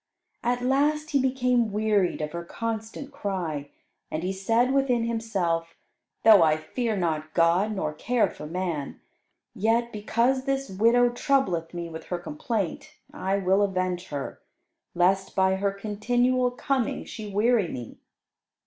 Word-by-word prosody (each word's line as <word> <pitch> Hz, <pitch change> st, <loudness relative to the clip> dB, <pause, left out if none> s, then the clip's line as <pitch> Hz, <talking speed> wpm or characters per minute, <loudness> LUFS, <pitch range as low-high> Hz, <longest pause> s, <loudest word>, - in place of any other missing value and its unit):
At 245 Hz, +1 st, 0 dB
last 295 Hz, +4 st, +1 dB
he 280 Hz, -2 st, +3 dB
became 250 Hz, -3 st, +1 dB
wearied 205 Hz, -5 st, +1 dB
of 150 Hz, 0 st, -3 dB
her 170 Hz, 0 st, -5 dB
constant 225 Hz, +8 st, -5 dB
cry, 180 Hz, -, -3 dB, 0.4 s
and 155 Hz, +2 st, -3 dB
he 185 Hz, +1 st, -1 dB
said 230 Hz, +7 st, +1 dB
within 265 Hz, -4 st, +2 dB
himself, 195 Hz, -8 st, -1 dB, 0.5 s
"Though 215 Hz, -4 st, +8 dB
I 155 Hz, -1 st, +4 dB
fear 220 Hz, +7 st, -2 dB
not 155 Hz, -3 st, -2 dB
God 180 Hz, +6 st, +3 dB
nor 155 Hz, -6 st, -2 dB
care 240 Hz, +9 st, +1 dB
for 150 Hz, -, -9 dB
man, 170 Hz, -4 st, -3 dB, 0.5 s
yet, 230 Hz, +3 st, +1 dB
because 235 Hz, +5 st, +1 dB
this 275 Hz, -4 st, -1 dB
widow 230 Hz, +5 st, +4 dB
troubleth 240 Hz, -, 0 dB
me 170 Hz, -1 st, -4 dB
with 160 Hz, -1 st, -8 dB
her 180 Hz, -, -3 dB
complaint, 220 Hz, -, -4 dB, 0.2 s
I 190 Hz, +1 st, -1 dB
will 190 Hz, +1 st, +2 dB
avenge 185 Hz, -2 st, -1 dB
her; 140 Hz, -2 st, -5 dB, 0.5 s
lest 190 Hz, +2 st, +2 dB
by 190 Hz, 0 st, +3 dB
her 200 Hz, +1 st, 0 dB
continual 245 Hz, +5 st, +1 dB
coming 255 Hz, 0 st, -1 dB
she 215 Hz, -2 st, -7 dB
weary 215 Hz, 0 st, +3 dB
me." 120 Hz, -7 st, -8 dB
210 Hz, 140 wpm, -26 LUFS, 175-245 Hz, 0.5 s, Though